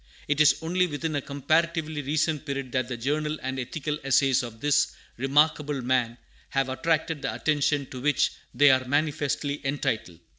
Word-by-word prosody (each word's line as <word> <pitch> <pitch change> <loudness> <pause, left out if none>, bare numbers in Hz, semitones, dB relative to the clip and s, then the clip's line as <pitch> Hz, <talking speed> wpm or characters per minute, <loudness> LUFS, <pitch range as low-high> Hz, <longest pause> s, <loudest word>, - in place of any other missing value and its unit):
It 150 +1 +2
is 150 - +6
only 180 +2 +1
within 155 0 -3
a 145 - 0
comparatively 155 +3 0
recent 150 +1 0
period 140 -3 -4
that 130 -1 0
the 125 -2 -4
journal 150 +5 -1
and 130 0 -3
ethical 150 +4 -3
essays 135 0 +3
of 115 -3 -8
this 145 +3 +2 0.2
remarkable 145 +1 +2
man 125 -2 +1 0.3
have 135 -1 0
attracted 160 +2 0
the 135 - -2
attention 145 -2 0
to 130 - -7
which 145 0 +2 0.2
they 145 +3 +6
are 130 0 +2
manifestly 145 0 -1
entitled. 115 - -2
145 Hz, 160 wpm, -26 LUFS, 130-150 Hz, 0.3 s, is